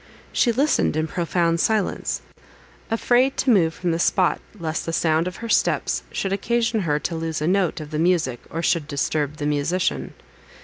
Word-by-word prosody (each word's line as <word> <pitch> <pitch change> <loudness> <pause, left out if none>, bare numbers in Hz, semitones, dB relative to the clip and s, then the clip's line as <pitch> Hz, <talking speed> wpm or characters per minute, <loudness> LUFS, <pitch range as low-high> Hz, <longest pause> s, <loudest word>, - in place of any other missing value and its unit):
She 240 - +3
listened 275 - +2
in 155 0 +1
profound 170 0 0
silence, 215 +1 0 0.7
afraid 245 +4 +2
to 260 - +2
move 170 -7 +3
from 175 -2 -1
the 165 - -1
spot, 180 +1 +2 0.2
lest 160 -3 -3
the 165 - -2
sound 160 +1 +2
of 180 - -5
her 230 - -6
steps - - +1
should 195 0 -2
occasion 230 +2 0
her 155 -6 +1
to 170 - -2
lose 160 -1 -3
a 155 - -1
note 185 -3 +1
of 155 -1 -8
the 155 - -2
music, 160 -8 +1
or 165 +1 -4
should 165 -3 +1
disturb 150 0 -1
the 145 - -3
musician. 150 +5 -1
170 Hz, 180 wpm, -23 LUFS, 155-200 Hz, 0.7 s, She